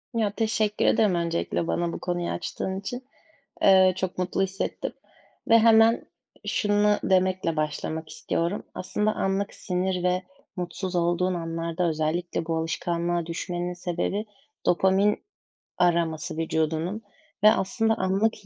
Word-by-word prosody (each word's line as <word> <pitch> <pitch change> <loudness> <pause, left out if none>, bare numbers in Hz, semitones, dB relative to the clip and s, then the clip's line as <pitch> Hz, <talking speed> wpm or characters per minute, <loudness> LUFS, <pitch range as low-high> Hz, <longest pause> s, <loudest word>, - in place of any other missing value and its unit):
Ya, 215 -3 +1
teşekkür 215 -2 0
ederim 205 -5 +4
öncelikle 170 0 -1
bana 170 -1 -1
bu - - -5
konuyu 175 -1 -2
açtığın 190 0 -3
için. 245 +5 -6 0.6
Eee, 190 -1 +7
çok 185 -1 -3
mutlu 185 +1 0
hissettim 195 +1 -3 0.6
ve 230 - +7
hemen 225 0 +5 0.4
şunu 205 0 +2
demekle 185 -3 +2
başlamak 155 +1 -2
istiyorum. 170 +4 -2
Aslında 210 +3 -1
anlık 195 +1 -1
sinir 180 0 -1
ve 180 +1 +1 0.3
mutsuz 180 +1 -4
olduğun 175 +2 +1
anlarda 165 +1 -2
özellikle 160 +2 -1
bu 165 -1 -1
alışkanlığa 170 +1 -1
düşmenin 175 +1 -3
sebebi 180 +4 -2 0.4
dopamin 190 +3 +3 0.6
araması 165 -3 +1
vücudunun 160 +5 -1 0.4
ve 215 - +9
aslında 220 +3 +1
anlık 195 +2 0
180 Hz, 120 wpm, -26 LUFS, 170-200 Hz, 0.6 s, ve